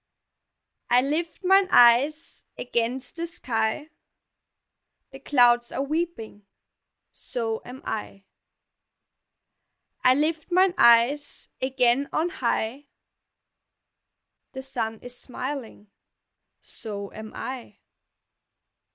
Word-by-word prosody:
I 245 +1 +5
lift 325 +6 -3
mine 385 +1 +5
eyes 265 +6 +4
against 245 +4 -3
the 335 +1 -3
sky, 255 -1 -2 1.2
The 270 - -11
clouds 240 -3 +3
are 270 - -2
weeping 280 - -4 0.6
so 225 -2 -4
am 255 +2 -10
I; 200 -2 -5 1.8
I 255 - +6
lift 310 +3 -1
mine 370 +1 +4
eyes 235 +5 +3
again 260 +1 +1
on 325 +3 0
high, 260 0 -2 1.7
The 265 0 -7
sun 230 -5 -4
is 245 0 -7
smiling 250 -5 -7 0.7
so 200 -3 -5
am 220 0 -9
I. 255 -2 -7
255 Hz, 90 wpm, -25 LUFS, 235-295 Hz, 1.8 s, I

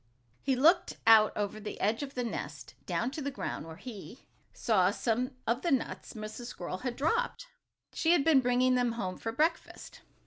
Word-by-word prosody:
He 265 -1 +1
looked 320 +8 +3
out 220 -1 +7
over 205 +1 -2
the 215 - -7
edge 215 +5 +1
of 280 -1 -6
the 250 - -1
nest, 235 - -6
down 240 - -1
to 300 - -5
the 280 - -2
ground, 260 - -5
where 160 - -8
he 225 +2 -10 0.3
saw 190 -5 +2
some 245 +5 -1
of 235 +3 0
the 345 - 0
nuts 270 -6 -1
Mrs. 215 +2 -7
Squirrel 185 -4 -6
had 250 +1 -3
dropped. 320 - 0 0.5
She 330 +1 +3
had 305 - +3
been 300 -3 +5
bringing 250 +1 +3
them 245 -2 +1
home 190 -5 -4
for 225 - -3
breakfast. 310 +7 -2
245 Hz, 185 wpm, -30 LUFS, 215-270 Hz, 0.5 s, out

